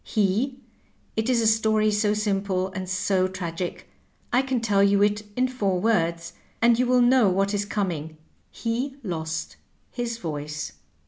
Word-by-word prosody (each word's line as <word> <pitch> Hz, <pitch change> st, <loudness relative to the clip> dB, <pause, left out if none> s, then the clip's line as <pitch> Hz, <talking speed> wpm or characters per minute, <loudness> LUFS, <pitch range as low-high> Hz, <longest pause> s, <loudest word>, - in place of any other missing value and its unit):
He 220 Hz, +6 st, 0 dB, 0.3 s
— -, -, -38 dB
^it 220 Hz, +2 st, 0 dB
is 245 Hz, -2 st, +3 dB
a -, -, +1 dB
story 220 Hz, -1 st, +3 dB
so 210 Hz, 0 st, +1 dB
simple 195 Hz, -3 st, 0 dB
and 185 Hz, -1 st, -5 dB
so 185 Hz, 0 st, +1 dB
tragic, 180 Hz, -2 st, -5 dB, 0.5 s
I 250 Hz, -, +5 dB
can 260 Hz, -2 st, -1 dB
tell 205 Hz, -3 st, +2 dB
you 200 Hz, 0 st, +4 dB
it 210 Hz, 0 st, +2 dB
in 255 Hz, +1 st, +2 dB
four 200 Hz, -8 st, -1 dB
words, 170 Hz, -5 st, 0 dB, 0.3 s
and 235 Hz, 0 st, +4 dB
you 250 Hz, -, +2 dB
wiU 250 Hz, 0 st, +4 dB
know 240 Hz, -4 st, +5 dB
what 195 Hz, +2 st, +1 dB
is 205 Hz, 0 st, 0 dB
coming 165 Hz, -7 st, -3 dB, 0.2 s
— -, -, -41 dB
^he 245 Hz, +4 st, -3 dB
lost 160 Hz, -5 st, -4 dB, 0.3 s
his 235 Hz, -2 st, -3 dB
voice.'' 150 Hz, -5 st, -5 dB
205 Hz, 170 wpm, -25 LUFS, 185-230 Hz, 0.5 s, I